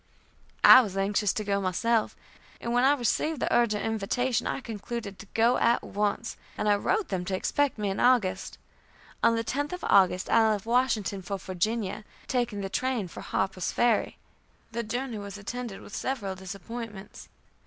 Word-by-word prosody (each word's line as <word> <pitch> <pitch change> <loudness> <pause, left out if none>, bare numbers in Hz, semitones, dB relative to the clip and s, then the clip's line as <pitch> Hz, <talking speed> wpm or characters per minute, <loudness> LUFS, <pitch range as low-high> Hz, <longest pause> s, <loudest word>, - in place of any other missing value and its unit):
I 255 - +11
was 195 -5 -5
anxious 200 0 +1
to 215 - -2
go 200 -1 0
myself, 220 +5 0 0.4
and 235 - -3
when 245 +1 +3
I 275 +2 +6
received 290 +4 0
the - - -1
urgent 215 -3 +2
invitation 225 +3 0
I - - -2
concluded 225 -3 -6
to 205 - -11
go 235 +2 +4
at 235 +1 +2
once, 210 +3 -2 0.2
and 210 - -1
I 205 - +5
wrote 395 - 0
them 185 -3 -2
to 190 - -1
expect 285 +8 0
me 205 -2 -1
in 195 - -4
August. 240 -7 +2 0.6
On 230 0 +4
the 230 - -1
10th 290 +7 -2
of 360 - -6
August 185 -1 +4
I 220 -1 +4
left 205 -1 -4
Washington 230 -5 +1
for 195 +2 -4
Virginia, 195 +3 -2 0.2
taking 240 -5 -1
the 195 - -3
train 240 -2 -1
for - - -9
Harper's 185 -1 -2
Ferry. 240 -3 +1 0.5
The 235 +1 -2
journey 240 +1 -4
was 200 0 -7
attended 230 0 -6
with - - -10
several 220 -8 -2
disappointments. 200 +2 -8
220 Hz, 175 wpm, -28 LUFS, 200-240 Hz, 0.6 s, I